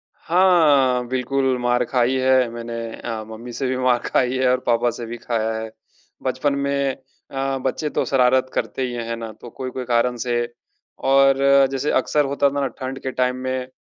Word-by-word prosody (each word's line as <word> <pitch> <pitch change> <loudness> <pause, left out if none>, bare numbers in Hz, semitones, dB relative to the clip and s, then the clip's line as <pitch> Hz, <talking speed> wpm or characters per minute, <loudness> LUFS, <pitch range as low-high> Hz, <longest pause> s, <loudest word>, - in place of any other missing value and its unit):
हाँ, 150 -9 +3
बिल्कुल 130 +1 0
मार 120 0 +2
खाई 125 0 +1
है 130 -2 +3
मैंने 115 0 -6 0.2
अ, 110 -2 -5
मम्मी 115 +2 -9
से 135 +2 -2
भी 130 0 -1
मार 125 -1 +2
खाई 130 0 +1
है 130 -1 +2
और 130 - +2
पापा 120 0 +2
से 120 0 -7
भी 120 +1 -6
खाया 115 -1 -2
है। 110 0 -5 0.5
बचपन 130 +2 0
में 140 -1 0 0.4
अ, 135 0 -1
बच्चे 150 +3 -1
तो - - -1
शरारत 130 0 +3
करते 115 +2 -2
ही 125 - -5
है, 120 -1 -3
हैं 115 - -2
ना, 115 -1 -6
तो 110 +3 -12
कोई-कोई 130 +1 -5
कारण 120 +1 +1
से 120 -1 0 0.7
और 135 0 +5 0.3
जैसे 135 +2 -1
अक्सर 150 -1 +2
होता 140 0 +2
था 145 - -3
ना 135 - +1
ठंड 130 +1 -5
के 130 - -3
टाइम 125 0 0
में 130 0 -2
अ, - - -22
130 Hz, 195 wpm, -21 LUFS, 120-135 Hz, 0.7 s, और